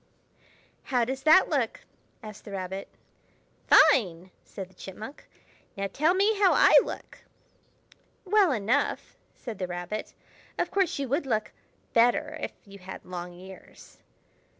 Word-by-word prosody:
"How 245 -3 +1
does 265 +2 -4
that 315 +6 +6
look?" - - -1 0.4
asked 215 -1 -10
the - - -11
Rabbit. 190 0 -5 0.8
"Fine!" 190 - +4
said 195 -3 -8
the 190 - -24
Chipmunk. 215 +9 -10 0.5
"Now 195 0 -2
tell 315 +5 +2
me 405 +2 +2
how 390 -3 +5
I - - +5
look!" - - -8 1.1
"Well 395 -3 +4
enough!" 240 +4 -1 0.2
said 230 -5 -8
the 185 - -2
Rabbit. 175 +4 -6 0.4
"Of - - -1
course, 385 -3 +1
you 280 -1 -3
would 280 +2 -1
look 215 -4 -1 0.4
better 235 +1 +3
if - - -4
you 200 -1 -13
had 185 +1 -10
long 180 -1 -7
ears." 190 +1 -14
220 Hz, 135 wpm, -27 LUFS, 190-290 Hz, 1.1 s, that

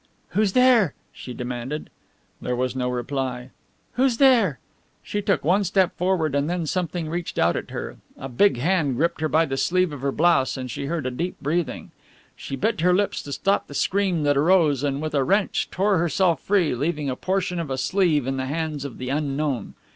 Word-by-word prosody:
"Who's 210 -2 +1
there?" 250 - +4 0.2
she 125 - -9
demanded. 125 +4 -5 0.5
There 125 - -2
was 130 +1 -1
no 125 -1 -1
reply. 125 0 -3 0.4
"Who's 255 -2 +2
there?" 235 - +4 0.5
She 205 - -3
took 200 -1 0
one 190 +5 +3
step 190 0 +1
forward 180 -5 0
and 140 +2 0
then 175 -1 -1
something 175 0 -2
reached 170 +2 -4
out 85 +1 +3
at - - -4
her. - - -6 0.2
A 135 - -6
big 130 +4 +3
hand 150 -1 +1
gripped 165 +4 0
her 155 - +1
by 160 +2 +3
the 135 -3 -3
sleeve 185 +2 +1
of 140 - -7
her 140 0 0
blouse 140 -5 +2
and 130 -1 -5
she 140 - -4
heard 160 -3 -2
a 130 - -1
deep 170 +8 -3
breathing. 160 +3 -2 0.4
She 135 - -6
bit 160 - -1
her 180 +1 +4
lips 205 +1 0
to 145 - -9
stop 195 +7 0
the 145 - -10
scream 185 -3 +1
that 145 -1 +2
arose, 155 -3 +3
and 140 +1 -1
with 155 - -3
a 140 -2 +2
wrench 200 +7 +1
tore 195 -1 +1
herself 170 +1 +1
free, 190 -6 +2
leaving 150 +3 -2
a 130 - -1
portion 185 +2 -1
of 165 -4 -4
a 130 - -2
sleeve 155 -1 +1
in 135 0 -2
the 130 0 -2
hands 155 -1 -3
of 135 - -7
the 130 0 -5
unknown. 140 -4 -2
155 Hz, 205 wpm, -23 LUFS, 135-185 Hz, 0.5 s, there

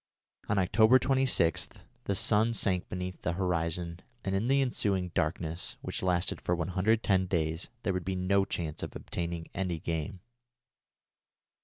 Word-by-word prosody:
On 105 - +2
October 110 +6 +5
26 130 - +2 0.4
the 100 - 0
sun 110 +4 +3
sank 95 -3 +1
beneath 90 -1 -5
the 80 - -1
horizon, 85 -1 -1 0.3
and 95 - -1
in 100 +4 0
the 135 +1 +4
ensuing 100 -8 +1
darkness, 85 0 -2
which - - -3
lasted 90 0 +1
for 90 - 0
110 95 +2 +1
days, 80 -2 -1
there 95 - 0
would 90 -1 -2
be 95 +2 -2
no 95 +2 +2
chance 80 -5 -4
of - - -6
obtaining 85 -1 -4
any 90 -3 -1
game. 80 +2 -4
90 Hz, 145 wpm, -30 LUFS, 85-100 Hz, 0.4 s, October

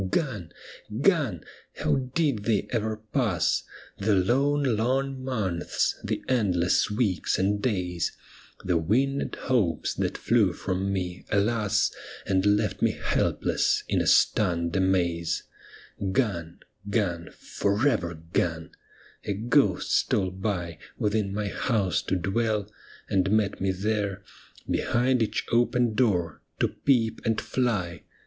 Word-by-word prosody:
Gone, 100 - -2 0.5
gone! 145 - +2
— - - -30
how - - +1 0.2
did 140 -11 +1
they 110 -4 +1
ever 110 -2 -1 0.2
pass, 110 - +1 0.4
The 100 +1 +2
lone, 135 +6 +2
long 130 +4 -1
months, 100 -10 -1
the - - -2
endless 95 -10 +2
weeks 105 -5 0
and 100 +2 +1
days, 90 -8 -1 0.5
The 90 -2 +2
winged 130 - 0
hopes 105 - +1
that - - -2
flew 105 -6 +2
from 95 +2 -2
me, 90 -2 -3
alas, 105 0 +2 0.3
And 95 -1 +1
left 105 -1 +1
me - - +2
helpless - - +1
in - - +1
a - - -1
stunned 85 -4 +3
amaze 90 -3 +1 0.6
I - - -1
Gone, 95 -5 -1 0.3
gone, 90 -6 -1
for 105 +7 0
ever 85 - 0
gone! 80 0 -2 0.3
— - - -27
a 105 - -1
ghost 110 -1 +2
stole 95 -2 +1
by 90 -4 -3 0.2
Within 105 -1 0
my 105 +1 -2
house 105 -8 0
to - - -1
dwell, 105 +2 0 0.4
and 95 0 +1
met 105 -2 +1
me 95 0 +1
there. 100 0 -2 0.4
Behind 125 +1 +1
each 110 -1 -1
open 120 0 +2
door 95 -9 +1 0.2
to - - +2
peep 115 -5 +1
and 110 -1 +1
fly. 95 -11 -1
100 Hz, 130 wpm, -26 LUFS, 90-115 Hz, 0.6 s, stunned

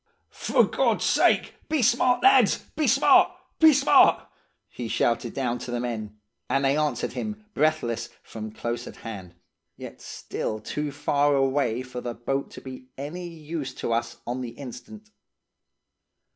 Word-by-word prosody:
'For - - +2
God's - - +1
sake, - - +3 0.2
be 305 -5 +1
smart, 245 +2 +3
lads! 395 - +5
Be 305 -3 +1
smart! 265 +5 +5 0.3
Be 320 -1 +8
smart!' 280 0 +5 0.4
he 120 - -6
shouted 115 +1 0
down 125 -3 -1
to - - -7
the 120 0 -2
men, 110 -3 -4 0.3
and 135 0 +1
they 135 +1 +3
answered 150 -1 -1
him, 215 0 -5
breathless, 120 -7 0
from 110 -1 -7
close 120 +2 -4
at - - -9
hand, 95 -6 -8 0.4
yet - - -10
still 110 - -5
too 150 +7 -4
far 145 0 +1
away 135 -3 +1
for 125 -1 -7
the 120 -1 -5
boat 135 +4 -2
to - - -11
be 130 -1 -10
any 165 +6 -6
use 155 -5 -6
to 115 - -2
us 115 - -2
on 125 +2 -3
the 125 - -4
instant. 145 - -10
135 Hz, 155 wpm, -25 LUFS, 120-155 Hz, 0.4 s, Be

